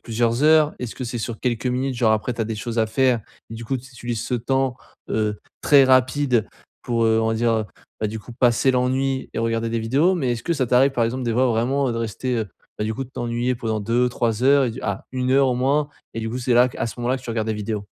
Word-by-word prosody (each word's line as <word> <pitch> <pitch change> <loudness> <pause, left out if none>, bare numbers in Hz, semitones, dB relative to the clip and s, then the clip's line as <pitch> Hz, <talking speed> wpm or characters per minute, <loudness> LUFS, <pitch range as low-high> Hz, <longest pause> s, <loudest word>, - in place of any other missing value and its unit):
plusieurs 115 +3 0
heures? 155 -1 +5
Est-ce 125 -3 -5
que - - -7
c'est 120 0 -4
sur 115 0 -5
quelques 120 -1 -1
minutes, 130 +2 -1
genre 115 -2 +3
après 110 +3 0
tu 115 - -5
as - - +1
des 110 +1 -3
choses 115 +2 -4
à 110 - +3
faire 125 +1 +2 0.3
et - - -6
du 115 +1 -7
coup 135 +4 -1
tu 130 +1 -11
utilises 120 -3 -4
ce 125 - -2
temps, 130 +1 0 0.3
heu, 105 -1 0 0.2
très 140 -2 +6
rapide 130 -2 +3 0.4
pour, 115 -1 0
heu, 110 0 +3
on 110 - +1
va 115 - 0
dire, 115 +1 +1
heu, 110 -1 0 0.4
bah 110 - +1
du 110 +1 -5
coup, 120 - -12
passer 120 +2 +3
l'ennui 130 +1 0
et - - -4
regarder 115 0 -1
des 115 - -1
vidéos? 140 +11 +2
Mais 135 -9 0
est-ce 115 -1 -5
que 170 - +1
ça 135 -6 0
t'arrive 135 +2 +4
par 125 - 0
exemple 125 +2 -2
des 115 - 0
fois 125 +3 +3
vraiment, 130 +4 +1
heu, - - -1
de - - -4
rester, 115 +3 -2
heu, 110 -2 -3 0.3
bah 105 - -1
du 110 +1 -2
coup, 135 - -3
de - - -15
t'ennuyer 120 +1 -1
pendant 110 -2 -2
2-3 120 0 0
heures 140 0 +5
et - - -1
du 115 - -9
ah, 100 -1 -3
1 130 0 -1
heure 135 0 +4
au 125 - +1
moins, 145 +3 +1 0.3
et 115 - -3
du 110 0 -3
coup 125 - -3
c'est 125 -1 +1
là 125 +1 +6
qu - - -12
à - - 0
ce - - -6
moment-là 120 +2 0
que 130 - -11
tu 120 - -6
regardes 110 -1 -2
des 110 - 0
vidéos? 105 0 -4
120 Hz, 280 wpm, -22 LUFS, 115-130 Hz, 0.4 s, très